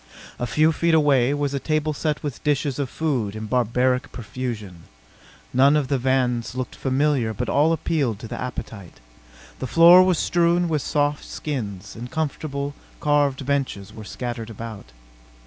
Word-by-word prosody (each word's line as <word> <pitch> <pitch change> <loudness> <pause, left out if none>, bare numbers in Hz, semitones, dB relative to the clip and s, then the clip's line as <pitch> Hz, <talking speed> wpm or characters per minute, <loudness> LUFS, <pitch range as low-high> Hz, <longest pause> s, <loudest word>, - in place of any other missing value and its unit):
A 120 - -1
few 155 +6 +3
feet 165 +1 +2
away 140 -5 +4
was 145 -1 -1
a 140 - -1
table 155 +1 0
set 150 +1 -2
with 145 -4 -5
dishes 145 -2 0
of 140 -3 -1
food 125 -11 -1
in 110 0 -5
barbaric 125 +3 +1
profusion. 105 -6 -6 0.7
None 140 +3 +5
of 140 -3 -1
the 140 -2 +1
viands 125 -2 0
looked 130 -1 -4
familiar 135 -4 0
but - - -3
all 150 +3 +3
appealed 145 -8 0
to 115 - -7
the - - -6
appetite. 110 - -7 0.6
The 130 - -3
floor 170 +8 +8
was 185 -2 +3
strewn 175 +1 +2
with 155 -3 0
soft 145 +1 0
skins, 105 -10 -5
and 120 +2 -7
comfortable, 145 -2 -3 0.3
carved 145 -3 +1
benches 130 -8 -2
were 110 - -9
scattered 120 +1 -5
about. 110 -1 -8
135 Hz, 160 wpm, -23 LUFS, 120-150 Hz, 0.7 s, floor